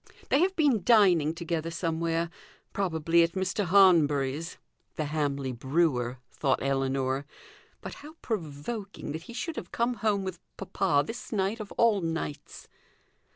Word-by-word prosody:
"They 275 - +4
have 375 +3 +2
been 285 - +3
dining 180 -9 +4
together 165 -1 -3
somewhere. 165 0 -1 0.4
Probably 170 -3 +2
at 165 0 +2
Mr. 190 +1 -1
Hanbury's" 165 -5 +4 0.4
(the 155 - -2
Hamley 145 -3 -1
brewer), 130 -1 0
thought 135 -3 0
Ellinor. 135 0 0 0.5
"But - - -7
how 300 +2 -11
provoking 195 0 -5
that 160 +2 -5
he - - -7
should 325 +6 -4
have 175 - -6
come 235 +1 0
home 215 -4 0
with 185 -2 -5 0.2
papa 190 -6 +1
this 240 +9 -7
night 205 +1 0
of 210 -2 -7
all 225 -4 +3
nights!" 165 -3 -5
170 Hz, 140 wpm, -28 LUFS, 145-200 Hz, 0.5 s, They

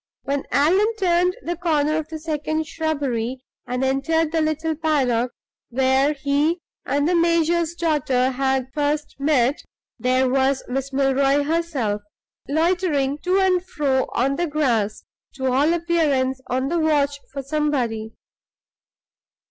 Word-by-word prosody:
When 280 0 -2
Allan 380 +10 +3
turned 360 -1 +2
the 345 - -2
corner 310 -3 +1
of 315 -1 -3
the 320 - -5
second 310 0 -2
shrubbery, 270 -6 -2 0.2
and 250 +1 -2
entered 305 +4 +1
the 325 -1 +1
little 310 +1 0
paddock 260 -6 +1 0.4
where 265 +3 +2
he 290 +4 +1 0.3
and 285 +2 +1
the 360 - +2
major's 335 0 +2
daughter 275 -6 +1
had 265 0 -1
first 295 0 -1
met, 275 -2 +2 0.4
there 255 +2 +2
was 265 +1 +1
Miss 270 +2 -3
Milroy 275 +1 +2
herself 285 -10 -1 0.5
loitering 315 -3 +1
to 365 +4 +1
and 370 -2 +2
fro 275 -7 0
on 275 +3 +1
the 345 - 0
grass, 240 -9 0 0.3
to 265 -1 -1
all 285 +5 +3
appearance 305 -7 +1
on 260 +2 -1
the 340 +1 0
watch 290 -3 +1
for 275 -1 -5
somebody. 260 -7 -1
290 Hz, 130 wpm, -22 LUFS, 265-320 Hz, 0.5 s, Allan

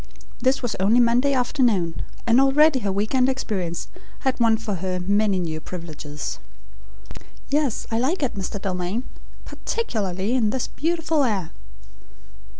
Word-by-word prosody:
This 260 +2 +1
was 240 - -1
only 210 +6 +4
Monday 245 +3 +4
afternoon, 240 - +1 0.2
and 240 +2 +5
already 275 +1 +5
her 200 -4 -1
week 205 +4 -1
end 260 0 +4
experience 195 -10 -2 0.3
had 265 -2 0
won 225 -1 +4
for 215 -3 -3
her 185 -1 -1
many 200 +2 +2
new 160 -3 -3
privileges. 155 -4 -6 1.1
"Yes, 285 -4 0
I 225 - +1
like 290 +7 0
it, 265 - 0
Mr. 200 0 -4
Dalmain; 190 +4 -2 0.4
particularly 210 - -2
in 235 -5 +2
this 255 +2 -1
beautiful 325 -1 0
air." 200 -9 -1
225 Hz, 140 wpm, -23 LUFS, 190-265 Hz, 1.1 s, and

